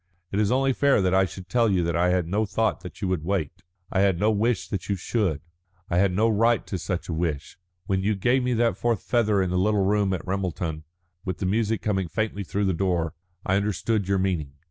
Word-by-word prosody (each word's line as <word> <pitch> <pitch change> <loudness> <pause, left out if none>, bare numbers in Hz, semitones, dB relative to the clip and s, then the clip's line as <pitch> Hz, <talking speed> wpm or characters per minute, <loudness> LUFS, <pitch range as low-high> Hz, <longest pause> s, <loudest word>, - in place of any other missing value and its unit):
"It 100 - 0
is 105 +1 +2
only 135 +1 +2
fair 140 -1 +3
that 95 -1 +1
I 95 0 +4
should 95 0 -9
tell 115 +1 +2
you 90 -4 +1
I 90 +1 +3
had 90 -2 +1
no 105 +5 +1
thought 110 +1 0
that 90 +3 -10
you - - +1
would 90 -5 -1
wait. 90 -4 -2 0.3
I 95 - +1
had 95 -3 +3
no 105 +3 +3
wish 105 -3 0
that 95 0 -5
you 100 - +1
should; 90 -5 -1 0.5
I 85 - +3
had 100 0 +3
no 105 +5 +2
right 115 +1 +2
to 95 - -4
such 90 +1 -3
a 85 - -3
wish. 80 -1 -3 0.3
When 95 -1 0
you 105 +2 +1
gave 120 +7 +2
me 125 -1 0
that 115 0 +1
fourth 115 -4 0
feather 105 -5 +2
in 90 - -2
the 90 - +1
little 100 0 +2
room 100 -1 +2
at 90 - -4
Ramelton, 90 -4 -3 0.4
with 95 -2 -3
the - - -3
music 110 +1 0
coming 95 -4 0
faintly 110 +1 -2
through 100 +2 -1
the 95 - +1
door, 85 -2 0 0.3
I 95 - +2
understood 100 0 -1
your 100 0 +2
meaning. 90 -7 -1
95 Hz, 235 wpm, -25 LUFS, 90-110 Hz, 0.5 s, I